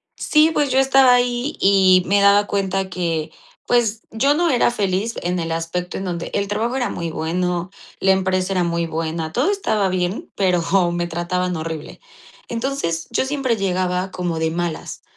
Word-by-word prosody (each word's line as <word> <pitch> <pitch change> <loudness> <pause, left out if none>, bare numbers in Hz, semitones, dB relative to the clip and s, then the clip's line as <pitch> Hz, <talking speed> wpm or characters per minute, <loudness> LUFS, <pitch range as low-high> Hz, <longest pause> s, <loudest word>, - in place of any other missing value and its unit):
Sí, 310 +1 +3
pues, 290 -2 +1
yo 265 - +3
estaba 270 -1 +5
ahí, 245 +4 -1
y 190 -2 +5
me 200 +1 +3
daba 200 +1 +5
cuenta 195 -1 -1
que, 165 -3 -2 0.4
pues, 230 -2 +1
yo 275 +6 +2
no 345 +1 +2
era 245 -3 +3
feliz, 200 +1 -1
en 180 0 -1
el 165 0 -3
aspecto 165 +2 -3
en 195 - -5
donde 175 -2 -4
el 200 0 0
trabajo 225 +5 -1
era 250 -2 -1
muy 170 -1 -4
bueno, 175 +3 -2 0.3
la 190 - +3
empresa 190 0 0
era 180 - +1
muy 170 0 -1
buena, 160 0 -3
todo 275 - +2
estaba 215 - 0
bien, 185 +1 -2
pero 180 -3 +2
hom 175 -3 +3
me 175 0 -1
trataban 180 +2 -2
horrible. 160 -1 -6 0.5
Entonces, 230 -9 -2
yo - - 0
siempre 265 -4 -1
llegaba 185 -1 -1
como 175 -3 -3
de 160 0 0
malas, 170 -1 -4
185 Hz, 180 wpm, -20 LUFS, 175-230 Hz, 0.5 s, estaba